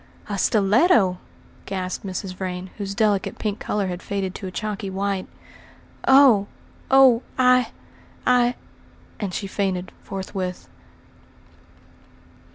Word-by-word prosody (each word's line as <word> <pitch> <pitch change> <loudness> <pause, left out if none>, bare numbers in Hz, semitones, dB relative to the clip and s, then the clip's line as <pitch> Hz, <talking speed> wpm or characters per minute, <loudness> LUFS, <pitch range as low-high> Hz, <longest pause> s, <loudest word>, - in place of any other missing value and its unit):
"A 205 - -3
stiletto!" 210 - +3 0.5
gasped 185 -2 -4
Mrs. 190 -1 -5
Vrain, 185 0 -5
whose 200 -1 -4
delicate 205 -3 +1
pink 210 -1 -3
colour 205 -1 -1
had 180 -1 -4
faded 195 -2 -3
to 195 - -6
a - - -6
chalky 210 0 -4
white. 195 0 -2 0.8
"Oh! 265 -7 +6 0.4
oh! 265 -3 +6 0.2
I 250 -2 +4 0.6
I 245 -1 +3 0.3
" - - -28
and 200 -3 -3
she 200 - -4
fainted 190 -2 -2
forthwith. 185 - -5
200 Hz, 115 wpm, -23 LUFS, 185-225 Hz, 0.8 s, Oh